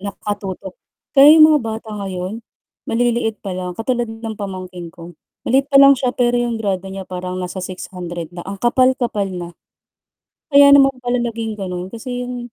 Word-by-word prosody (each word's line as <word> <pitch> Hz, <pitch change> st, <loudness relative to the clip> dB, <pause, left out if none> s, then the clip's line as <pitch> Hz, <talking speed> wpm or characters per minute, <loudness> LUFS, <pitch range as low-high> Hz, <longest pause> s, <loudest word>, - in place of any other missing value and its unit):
Nakatutok. 200 Hz, -1 st, -5 dB, 0.4 s
Kaya 290 Hz, +3 st, +8 dB
yung 310 Hz, -, +9 dB
mga 300 Hz, -, +3 dB
bata 225 Hz, -1 st, -6 dB
ngayon, 195 Hz, +1 st, -5 dB, 0.5 s
maliliit 235 Hz, -1 st, 0 dB
pa 195 Hz, -, -4 dB
lang 180 Hz, -1 st, -5 dB
katulad 240 Hz, 0 st, -1 dB
ng 225 Hz, 0 st, -6 dB
pamangkin 185 Hz, -3 st, -7 dB
ko, 170 Hz, +1 st, -12 dB, 0.3 s
maliit 270 Hz, +3 st, +2 dB
pa 280 Hz, -, +3 dB
lang 275 Hz, 0 st, +9 dB
siya 255 Hz, -2 st, -1 dB
pero 245 Hz, -1 st, +2 dB
yung 240 Hz, -1 st, -1 dB
grado 195 Hz, -3 st, -3 dB
niya 190 Hz, 0 st, -7 dB
parang 180 Hz, 0 st, -6 dB
nasa 185 Hz, +1 st, -5 dB
600 180 Hz, -2 st, -7 dB
na 175 Hz, -, -8 dB
ang 195 Hz, +1 st, -5 dB
kapal-kapal 240 Hz, -2 st, +1 dB
na. 180 Hz, -2 st, -6 dB, 1.0 s
Kaya 280 Hz, 0 st, +8 dB
naman 275 Hz, -1 st, +6 dB
pala 245 Hz, 0 st, -1 dB
naging 230 Hz, -2 st, -3 dB
gano'n 180 Hz, -2 st, -5 dB
kasi 245 Hz, +4 st, -6 dB
yung 245 Hz, -1 st, -7 dB
220 Hz, 170 wpm, -19 LUFS, 185-245 Hz, 1.0 s, yung